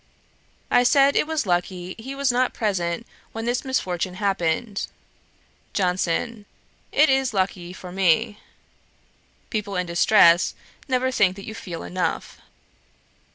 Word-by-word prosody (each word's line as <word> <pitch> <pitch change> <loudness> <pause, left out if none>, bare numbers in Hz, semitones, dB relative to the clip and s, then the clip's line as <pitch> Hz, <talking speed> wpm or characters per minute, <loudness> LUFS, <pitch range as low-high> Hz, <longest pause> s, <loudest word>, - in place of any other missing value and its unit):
I 245 - +6
said, 275 +3 +4
it - - +2
was 315 -5 -1
lucky 180 0 -1
he 265 +5 -7
was 280 -1 +1
not 250 +1 +1
present 190 -2 -1 0.3
when 225 0 -4
this 245 +1 0
misfortune 185 -9 -2
happened. 195 +1 -1 0.9
JOHNSON. 190 +4 -1 0.4
'It 305 - +5
is 265 -4 +1
lucky 185 -2 -1
for 180 -1 -10
me. 190 +2 +2 1.1
People 205 -2 -3
in 180 0 0
distress 170 0 +5 0.3
never 260 -1 +1
think 190 -7 +3
that 195 - -9
you 220 - -6
feel 175 -6 -7
enough.' 180 -1 -3
200 Hz, 125 wpm, -23 LUFS, 180-245 Hz, 1.1 s, I